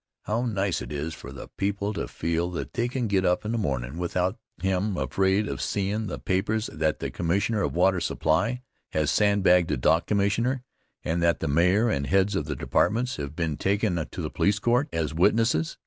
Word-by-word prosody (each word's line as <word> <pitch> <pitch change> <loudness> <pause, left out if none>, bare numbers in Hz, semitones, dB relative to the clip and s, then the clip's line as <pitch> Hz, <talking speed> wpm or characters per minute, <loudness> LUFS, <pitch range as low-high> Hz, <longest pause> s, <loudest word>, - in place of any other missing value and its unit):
How 115 +4 -1
nice 100 -5 -1
it - - -7
is 75 +3 -3
for - - -10
the - - -9
people 100 +1 -1
to - - -3
feel 85 +1 -1
that - - -5
they 120 0 0
can 125 0 -2
get 100 -3 +1
up 95 +4 +1
in 110 - -1
the 115 - 0
mornin' 70 - -2
without 90 +1 -1 0.2
hem' 95 +1 0
afraid 95 +9 +1
of - - -4
seem' 100 0 -1
in 110 0 -2
the 90 - -4
papers 105 +4 -1
that 80 -1 0
the - - -4
Commissioner 100 +5 0
of - - -1
Water 95 +1 +3
Supply 90 +11 0 0.3
has 75 -1 +1
sandbagged 95 -4 +4
the 75 - 0
Dock 80 +7 +2
Commissioner, 115 +6 +1 0.4
and 85 +2 -1
that 85 0 +2
the 80 - -2
Mayor 90 +10 +3
and 70 0 -1
heads 95 +1 +2
of 80 - -1
the 75 -1 -3
departments 120 - 0
have 70 +1 -5
been 80 -4 -2
taken 95 -4 0
to - - -6
the - - -3
police 100 0 +2
court 120 +7 +1
as 80 -3 -2
witnesses! 95 -1 +2
95 Hz, 205 wpm, -26 LUFS, 80-105 Hz, 0.4 s, sandbagged